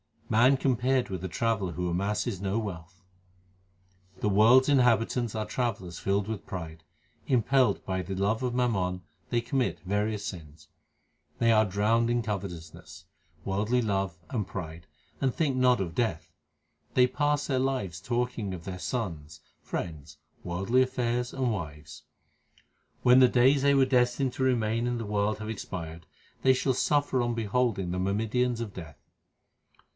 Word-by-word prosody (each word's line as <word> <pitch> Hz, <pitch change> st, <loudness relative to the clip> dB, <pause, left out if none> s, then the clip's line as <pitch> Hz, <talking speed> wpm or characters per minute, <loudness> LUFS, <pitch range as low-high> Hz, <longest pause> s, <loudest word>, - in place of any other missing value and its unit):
Man 120 Hz, +5 st, +5 dB
compared 130 Hz, -1 st, +1 dB
with 95 Hz, -2 st, -5 dB
a -, -, -1 dB
traveller 100 Hz, -1 st, -1 dB
who 90 Hz, 0 st, -2 dB
amasses 100 Hz, +4 st, -1 dB
no 100 Hz, +2 st, -1 dB
wealth: 95 Hz, -2 st, -6 dB, 1.2 s
The 105 Hz, -, +1 dB
world 110 Hz, +6 st, +6 dB
s 130 Hz, -, -2 dB
inhabitants 120 Hz, -3 st, +2 dB
are 110 Hz, -1 st, -2 dB
travellers 100 Hz, -10 st, -3 dB
filled 100 Hz, +1 st, 0 dB
with 110 Hz, -5 st, -5 dB
pride; 85 Hz, -6 st, -7 dB, 0.4 s
Impelled 130 Hz, +1 st, +2 dB
by 95 Hz, -1 st, -1 dB
the 95 Hz, +1 st, -5 dB
love 100 Hz, +5 st, 0 dB
of 125 Hz, -1 st, -2 dB
mammon 95 Hz, -7 st, 0 dB, 0.3 s
they 120 Hz, -1 st, +1 dB
commit 125 Hz, +1 st, -1 dB
various 105 Hz, +2 st, -1 dB
sins; 75 Hz, -4 st, -9 dB, 0.7 s
They 115 Hz, 0 st, +3 dB
are 110 Hz, -1 st, +5 dB
drowned 105 Hz, +4 st, +1 dB
in 120 Hz, 0 st, +1 dB
covetousness, 90 Hz, -5 st, -7 dB, 0.4 s
worldly 105 Hz, +6 st, +1 dB
love, 95 Hz, -5 st, -1 dB
and 105 Hz, -6 st, -2 dB
pride, 85 Hz, -3 st, -7 dB, 0.3 s
and 130 Hz, -2 st, 0 dB
think 140 Hz, -5 st, 0 dB
not 125 Hz, -3 st, +4 dB
of 85 Hz, -3 st, -3 dB
death; 100 Hz, -5 st, -2 dB, 0.6 s
They 125 Hz, -, +6 dB
pass 145 Hz, +2 st, 0 dB
their 130 Hz, -2 st, 0 dB
lives 130 Hz, -11 st, -2 dB
talking 120 Hz, -1 st, -2 dB
of 85 Hz, -, -10 dB
their 90 Hz, 0 st, -6 dB
sons, 85 Hz, -, -4 dB, 0.2 s
friends, 75 Hz, -2 st, -6 dB, 0.3 s
worldly 95 Hz, +8 st, +1 dB
affairs, 125 Hz, -1 st, -1 dB
and 130 Hz, -3 st, 0 dB
wives. 75 Hz, -7 st, -7 dB, 1.0 s
When 125 Hz, +1 st, +7 dB
the 130 Hz, -, +8 dB
days 130 Hz, +3 st, +4 dB
they 140 Hz, 0 st, +4 dB
were 135 Hz, -1 st, +5 dB
destined 125 Hz, 0 st, +1 dB
to 130 Hz, -, -2 dB
remain 115 Hz, -2 st, +1 dB
in 120 Hz, 0 st, -1 dB
the 115 Hz, -, -4 dB
world 105 Hz, +1 st, 0 dB
have 110 Hz, 0 st, -5 dB
expired, 85 Hz, -6 st, -6 dB, 0.3 s
they 130 Hz, -, +5 dB
shall 130 Hz, +1 st, +1 dB
suffer 145 Hz, 0 st, +1 dB
on 120 Hz, -1 st, -1 dB
beholding 110 Hz, -4 st, 0 dB
the 90 Hz, -, -2 dB
myrmidons 115 Hz, +5 st, 0 dB
of 105 Hz, -4 st, -5 dB
Death. 80 Hz, -7 st, -9 dB
110 Hz, 155 wpm, -28 LUFS, 95-125 Hz, 1.2 s, the